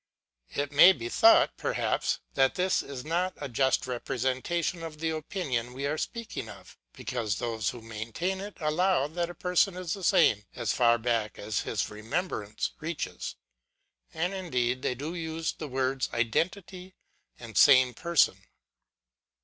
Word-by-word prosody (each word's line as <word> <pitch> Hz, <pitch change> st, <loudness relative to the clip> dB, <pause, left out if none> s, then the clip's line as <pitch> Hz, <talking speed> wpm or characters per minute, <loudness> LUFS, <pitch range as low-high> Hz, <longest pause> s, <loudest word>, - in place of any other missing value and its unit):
It 145 Hz, 0 st, -1 dB
may 175 Hz, +6 st, +8 dB
be 120 Hz, -6 st, -6 dB
thought, 335 Hz, -, +5 dB
perhaps, -, -, -1 dB
that 135 Hz, -1 st, +3 dB
this 185 Hz, +1 st, +1 dB
is 135 Hz, -3 st, -8 dB
not 175 Hz, +4 st, -1 dB
a 145 Hz, -, -5 dB
just 130 Hz, +2 st, +1 dB
represen 130 Hz, +1 st, -2 dB
tation 170 Hz, +1 st, -1 dB
of 160 Hz, -2 st, -7 dB
the 160 Hz, +1 st, -1 dB
opinion 145 Hz, -7 st, -3 dB
we 135 Hz, +2 st, -4 dB
are 145 Hz, +2 st, 0 dB
speaking 230 Hz, -, -5 dB
of: 100 Hz, -1 st, -13 dB, 0.2 s
because 115 Hz, -6 st, -3 dB
those 115 Hz, 0 st, -2 dB
who 120 Hz, -2 st, -8 dB
maintain 115 Hz, -, -3 dB
it 205 Hz, +1 st, -8 dB
allow, 165 Hz, 0 st, +2 dB
that 170 Hz, +3 st, -3 dB
a 175 Hz, -, -8 dB
person 180 Hz, +2 st, +1 dB
is 180 Hz, -3 st, -3 dB
the 195 Hz, -, -7 dB
same 105 Hz, -10 st, +4 dB
as 120 Hz, -4 st, -1 dB
far 120 Hz, -1 st, +4 dB
back 115 Hz, -3 st, -1 dB
as 105 Hz, +1 st, -2 dB
his 105 Hz, -, -2 dB
remembrance 110 Hz, -, -3 dB
reaches. 165 Hz, 0 st, -4 dB, 0.8 s
And 175 Hz, +4 st, -2 dB
indeed 130 Hz, -10 st, -1 dB
they 125 Hz, -, -1 dB
do 145 Hz, +6 st, -5 dB
use 160 Hz, -1 st, -3 dB
the 155 Hz, -, -7 dB
words 130 Hz, 0 st, -1 dB
identity 180 Hz, -, -2 dB, 0.4 s
and 115 Hz, -2 st, -11 dB
same 130 Hz, -3 st, +6 dB
person. 170 Hz, +5 st, +2 dB
140 Hz, 155 wpm, -28 LUFS, 120-175 Hz, 0.8 s, may